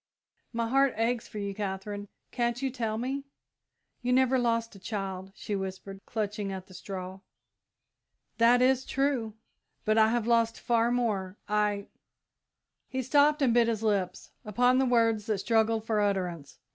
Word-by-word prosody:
"My 230 -1 -1
heart 270 +2 +3
aches 230 +1 0
for - - -9
you, 200 -1 -3
Katherine 205 0 -4 0.2
can't 240 -1 0
you 270 0 -1
tell 225 -4 -2
me?" 265 +4 -2 0.8
"You 250 0 -1
never 260 0 +4
lost 230 -1 0
a 195 - -13
child," 190 -2 -5
she 210 - -4
whispered, 190 0 -5
clutching 210 -2 -3
at 190 -1 -6
the 185 - -16
straw. 185 +1 -7 1.2
"That 240 +2 +6
is 260 0 +3
true, 265 -7 -1 0.5
but 215 +1 +3
I 220 - +6
have 230 0 0
lost 230 -1 +2
far 235 0 +2
more. 210 -6 -1
I 210 -1 +1 0.5
" - - -57
He 260 0 -2
stopped 290 +3 +4
and 245 -4 +4
bit 235 -1 +4
his 225 -2 -1
lips 195 -4 -1
upon 245 +5 +3
the 265 - +2
words 230 -3 +2
that 215 -2 +1
struggled 225 +1 +1
for 220 -2 +1
utterance. 180 -7 -2
225 Hz, 160 wpm, -29 LUFS, 200-245 Hz, 1.2 s, That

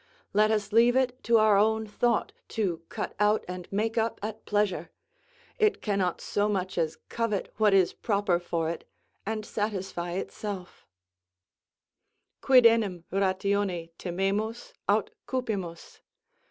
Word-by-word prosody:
Let 215 +1 +4
us 210 -1 0
leave 235 +2 +5
it 255 -1 +1
to 230 -1 +5
our 215 -2 +5
own 220 +1 +2
thought 235 +3 0 0.3
to 180 -7 0
cut - - -4
out 210 +1 +3
and 180 -1 -7
make 220 +3 0
up 225 +1 -1
at 215 +1 -5
pleasure; 205 -6 0 0.7
it 430 -1 +3
cannot 195 -4 0
so 205 +1 0
much 190 -2 -1
as 160 -2 -1
covet 230 -4 -2
what 215 -2 +4
is 190 -2 +4
proper 200 -5 +1
for 170 -2 -2
it, 170 - -7 0.4
and 215 -1 -2
satisfy 195 -5 -3
itself: 190 0 -6 1.5
Quid 255 -2 +6
enim 210 -7 +4
ratione 190 -2 0
timemus, 200 - -2 0.2
Aut - - +2 0.2
cupimus? 200 -10 -4
205 Hz, 130 wpm, -28 LUFS, 185-220 Hz, 1.5 s, Quid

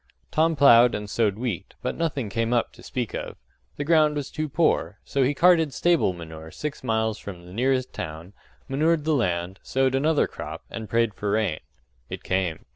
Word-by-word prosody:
Tom 160 +1 +2
ploughed 125 -4 +6
and 105 0 -5
sowed 105 -1 +1
wheat, 115 -8 -4
but - - -2
nothing 150 -8 -2
came 115 +3 -1
up 120 - 0
to - - -15
speak 125 -6 -4
of - - -5 0.4
the 145 - -2
ground 155 -1 +4
was 145 -2 -4
too 155 0 -3
poor; 160 +4 +1
so 140 - -1
he 135 +3 +2
carted 165 -3 +4
stable 170 - +3
manure 80 -2 -9
six 150 - -6
miles 110 -2 0
from 90 -3 -9
the 90 - -12
nearest 130 +3 0
town, 80 +5 -7 0.3
manured 155 +3 +1
the 160 - +2
land, 90 -7 -1
sowed 130 0 +1
another 150 +3 +2
crop, - - -8
and 110 -2 -6
prayed 115 -2 +2
for 105 +1 -4
rain. 100 -6 0 0.5
It - - -7
came. 90 -4 -1
120 Hz, 190 wpm, -25 LUFS, 100-145 Hz, 0.5 s, ploughed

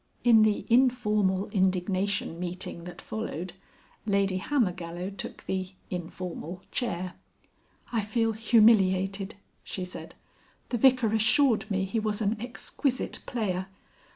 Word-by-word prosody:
In 230 -3 +7
the 215 -1 +2
informal 215 -6 +3
indignation 190 -2 0
meeting 175 -1 -4
that 180 - -9
followed, 185 -5 -5 0.5
Lady 200 -2 +2
Hammergallow 180 -7 -1
took 190 - -7
the 190 0 -3 0.2
(informal) 180 0 -5
chair. 185 -7 -2 0.8
"I 230 -2 +1
feel 225 +2 0
humiliated," 205 -3 +3 0.3
she 185 - -4
said. 180 - -9 0.5
"The 240 - -1
Vicar 250 -3 +4
assured 220 +1 +3
me 190 -1 0
he 225 +4 -1
was 215 -1 -1
an 215 0 +1
exquisite 250 +2 -2
player. 190 -6 -2
200 Hz, 115 wpm, -28 LUFS, 185-225 Hz, 0.8 s, In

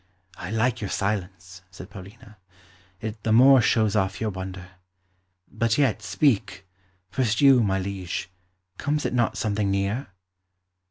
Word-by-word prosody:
"I 90 - -7
like 115 +2 0
your 100 - -3
silence," 95 -2 -4
said 95 0 -12
Paulina; 105 +3 -13 0.6
"it 110 0 -6
the 110 - -1
more 130 +3 +7
shows 110 -2 +2
off 95 -2 0
your 110 -1 -2
wonder. 95 -1 -7 0.8
But 115 +2 -1
yet, 140 -6 +1
speak. 100 -3 0 0.5
First 115 -3 0
you, 135 -3 +6
my 95 -3 +1
liege; 95 -2 -5 0.5
comes 150 +1 -1
it - - -1
not 120 -2 0
something 105 -1 -1
near?" 100 +7 -1
105 Hz, 140 wpm, -25 LUFS, 95-120 Hz, 0.8 s, more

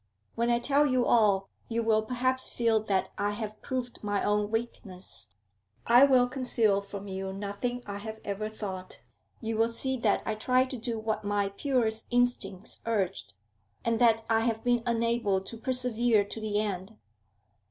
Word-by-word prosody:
'When 235 +1 0
I 240 - +4
tell 280 +4 +3
you 255 -2 +2
all, 200 -4 +3 0.2
you 230 0 0
will 220 -1 +3
perhaps 255 +3 0
feel 230 -2 +2
that 195 -3 0
I 205 0 +1
have 215 0 -6
proved 250 -3 -4
my 205 -1 0
own 210 0 +1
weakness. 220 -5 -5 0.6
I 245 +4 +7
will 255 -3 +4
conceal 235 -6 +2
from 200 0 -8
you 190 0 -4
nothing 205 +5 -4
I 200 0 -5
have 220 +1 -7
ever 205 +2 -3
thought; 190 -4 -7 0.4
you 225 -1 -2
will 225 +1 +3
see 260 +3 -2
that 220 -4 +1
I - - 0
tried 255 +4 +1
to 260 - -4
do 235 0 -2
what 220 0 -2
my 205 -1 0
purest 225 0 0
instincts 245 -5 -1
urged, 190 - -1 0.5
and 230 -1 +1
that 225 -2 +4
I 225 0 +3
have 225 -1 -1
been 245 -1 +2
unable 230 -4 +1
to 190 +4 -7
persevere 240 -3 +1
to 220 +2 -7
the 210 -1 0
end. 205 0 -3
225 Hz, 170 wpm, -29 LUFS, 205-240 Hz, 0.6 s, I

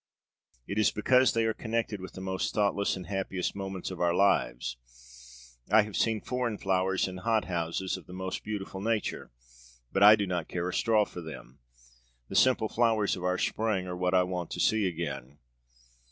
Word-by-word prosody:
It 100 - -2
is 110 - +4
because 125 +4 +3
they 115 -1 +1
are 110 - +1
connected 110 -3 -3
with 95 - -8
the 95 - -8
most 95 0 -2
thoughtless 100 -1 +1
and 90 -1 -7
happiest 95 -2 -3
moments 95 -2 -5
of 90 - -6
our 85 0 +2
lives. 60 -11 +1 0.9
I 110 0 +6
have 105 -1 -8
seen 110 -2 +1
foreign 125 -4 -2
flowers 95 0 +1
in 95 0 -7
hothouses, 95 -4 -1
of - - -14
the 90 - -10
most 95 0 -4
beautiful 100 -2 -5
nature, 110 0 -2 0.6
but 95 - 0
I 105 +1 +10
do 100 -1 -1
not 90 -3 -2
care 90 0 -3
a 90 - -3
straw 110 -2 +3
for 90 - -9
them. 75 -5 -10 0.7
The - - -6
simple 125 -4 +4
flowers 110 -3 +2
of 90 - -8
our 90 0 +1
Spring 105 -4 0
are 90 -1 -5
what 90 +1 0
I 90 - +5
want 90 -2 -4
to - - -5
see 110 -3 +3
again!' 70 -6 -5
95 Hz, 185 wpm, -29 LUFS, 90-110 Hz, 0.9 s, I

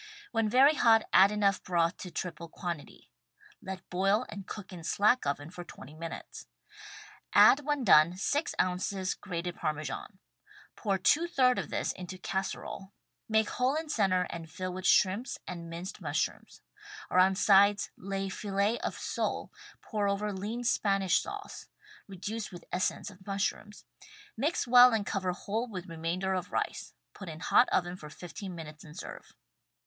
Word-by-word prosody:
When 225 -1 +1
very 265 +6 +6
hot, 225 -6 +4
add 195 +2 +7
enough 200 -2 +2
broth 170 -1 +1
to 180 - -7
triple 170 -2 -5
quantity 170 -3 -7 0.3
— 420 -4 -26
let 190 -3 -7
boil 195 +6 +2
and 200 -2 -8
cook 200 -3 -8
in 170 -2 -9
slack 210 - +2
oven 145 +3 -3
for 175 -1 -8
20 150 -4 -12
minutes. 165 +1 -8 0.9
Add 275 - +8
when 290 -3 0
done, 170 -3 +6
six 290 - -1
ounces 185 +1 0
grated 175 -2 -5
Parmesan. 155 +7 -4 0.6
Pour 200 -3 0
% 335 - +2
of 250 -1 +3
this - - -1
into 185 +1 -8
casserole, 190 +1 -4 0.4
make 220 -1 +2
hole 255 +3 +1
in 315 0 -3
center 195 -9 +2
and 165 -1 -7
fill 185 +1 -5
with 185 +1 -2
shrimps 200 +7 +3
and 170 -2 -6
minced 170 +4 -7
mushrooms; - - -3 0.5
around 185 +1 +4
sides 200 0 +5
lay 195 0 -4
fillet 200 +3 -1
of - - -3
sole, - - -3 0.3
pour 210 -3 -1
over 205 +1 -1
lean 210 +6 -4
Spanish 195 -5 +2
sauce 410 0 -8 0.2
— 425 0 -22
reduced 205 +3 -5
with 175 - -11
essence 185 +3 -1
of 190 0 -18
mushrooms 200 +1 -3 0.3
— - - -18 0.2
mix 290 +9 0
well 245 0 +8
and 210 -2 -1
cover 185 -1 -1
whole 215 +6 -3
with 185 -6 -6
remainder 175 +2 -2
of 180 -1 -3
rice - - -3
— - - -54
^put 195 - -10
in 160 0 -8
hot 240 - +4
oven 175 0 +1
for 155 -4 -10
fifteen 180 +3 -8
min 165 -1 -7
utes 150 0 -12
and 150 +1 -13
serve. - - -9
195 Hz, 165 wpm, -30 LUFS, 180-220 Hz, 0.9 s, Add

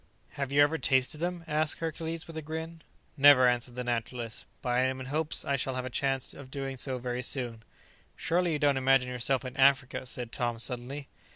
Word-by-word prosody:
"Have 140 -1 -4
you 145 +1 +6
ever 160 +2 +1
tasted 130 +2 +2
them?" 175 0 -2
asked 155 0 0
Hercules, 165 0 -3
with 165 - -10
a 160 - -3
grin. 160 +2 -6 0.4
"Never," 140 -2 +8
answered 125 0 0
the 125 - -3
naturalist; 120 -1 -3 0.2
"but 125 - -2
I 120 0 +2
am 130 0 +1
in 130 - -6
hopes 155 +4 -2
I 140 - +1
shall 130 0 -2
have 130 0 -3
a 130 - -5
chance 135 0 0
of 140 -2 -11
doing 135 0 -4
so 130 0 -2
very 125 0 -3
soon." 120 -3 -3 0.5
"Surely 175 0 +1
you - - +1
don't 145 -2 +3
imagine 130 -1 +3
yourself 125 +2 0
in 130 0 -6
Africa!" 135 -1 +3
said 125 -2 -3
Tom 120 -1 -1
suddenly. 125 +4 -4
135 Hz, 205 wpm, -30 LUFS, 125-150 Hz, 0.5 s, Never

